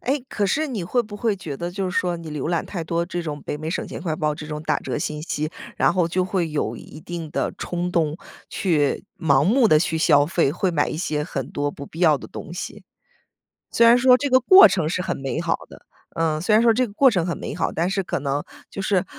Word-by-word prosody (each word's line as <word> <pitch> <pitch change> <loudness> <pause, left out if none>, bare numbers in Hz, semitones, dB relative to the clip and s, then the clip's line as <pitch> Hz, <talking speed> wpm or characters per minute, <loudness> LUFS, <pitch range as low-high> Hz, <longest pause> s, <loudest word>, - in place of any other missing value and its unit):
哎， 275 +3 0
可 205 - -1
是 310 +11 0
你 235 -9 -4
会 215 +9 +1
不 210 -3 -7
会 220 -2 0
觉 155 -7 -6
得 175 +3 -4
就 190 +1 -3
是 180 - -4
说 175 -1 -1
你 165 -1 -9
浏 150 +1 -3
览 170 -2 0
太 175 -4 -5
多 170 +1 -1
这 175 -1 -4
种 150 -3 -5
北 150 - -4
美 155 +1 -5
省 - - -3
钱 - - -7
快 160 -4 -2
报 150 -1 0
这 150 0 -8
种 150 -1 -5
打 155 - +1
折 - - -3
信 150 0 -4
息， 155 -2 -2 0.3
然 - - +3
后 175 -3 +2
就 180 +2 0
会 180 -3 -1
有 130 -7 -2
一 150 - -12
定 165 -2 -6
的 - - -1
冲 175 0 -3
动， 155 -2 +1 0.3
去 150 -7 0
盲 140 -3 +3
目 230 - +4
地 155 - +6
去 160 0 -1
消 145 -2 +4
费， 165 -4 +1
会 180 +4 -1
买 145 -3 +1
一 - - -4
些 150 -3 -2
很 135 -4 -4
多 145 0 -2
不 140 -1 -9
必 165 - -10
要 155 -5 +5
的 - - -10
东 170 - -9
西？ 180 - -7 0.9
虽 235 - +4
然 235 +1 +7
说 250 0 +6
这 285 - -1
个 255 0 +5
过 375 +10 +9
程 170 -6 0
是 175 - -2
很 185 - -2
美 135 +4 -3
好 170 -1 0
的 - - -14 0.4
呃， 160 -2 0
虽 205 +5 0
然 215 - +6
说 230 -1 +5
这 255 +2 +2
个 200 - -13
过 265 +5 +5
程 180 -8 +1
很 175 - -3
美 - - -5
好 - - -1
但 170 +2 -1
是 195 0 -1
可 - - -3
能， 140 +1 -2 0.3
就 195 - -6
是， 190 -1 +1
170 Hz, 280 characters per minute, -22 LUFS, 150-195 Hz, 0.9 s, 过